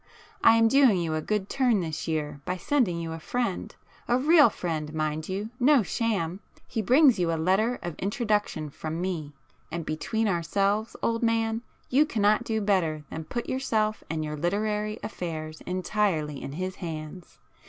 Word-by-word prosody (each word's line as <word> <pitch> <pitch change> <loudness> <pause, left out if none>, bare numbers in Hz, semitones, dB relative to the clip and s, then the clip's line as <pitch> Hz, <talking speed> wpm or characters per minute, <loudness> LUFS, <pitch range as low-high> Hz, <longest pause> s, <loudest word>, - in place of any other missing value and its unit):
I 225 - +8
am 225 0 +5
doing 255 -6 +5
you 165 -2 -1
a 155 - -1
good 210 +2 -1
turn 245 -6 +2
this 160 -1 -4
year 150 -3 -2
by 180 +4 -2
sending 200 -5 +1
you 165 -1 -4
a 165 - -5
friend,—a 240 +3 -3
real 295 0 +6
friend, 160 -6 -3
mind 155 +1 -2
you!—no 245 +7 +2
sham. 195 -5 -1 0.3
He 225 - -2
brings 255 +1 +5
you 170 -2 +1
a 165 - 0
letter 195 +9 +2
of 175 - -3
introduction 205 - -1
from 160 +3 -5
me, 170 -5 -3 0.4
and 165 -1 -4
between 160 +9 -1
ourselves, 200 +5 0
old 230 0 +1
man, 225 -1 +1 0.3
you 290 +4 +4
cannot 215 -2 +2
do 220 -1 -1
better 175 -7 +1
than 160 0 -5
put 240 +8 -4
yourself 220 -5 0
and 155 -1 -2
your 150 0 -4
literary 210 +6 -1
affairs 160 -6 -5
entirely 180 -5 -1
in 135 - -6
his 185 +4 -4
hands. 160 0 -7
190 Hz, 165 wpm, -27 LUFS, 160-225 Hz, 0.4 s, I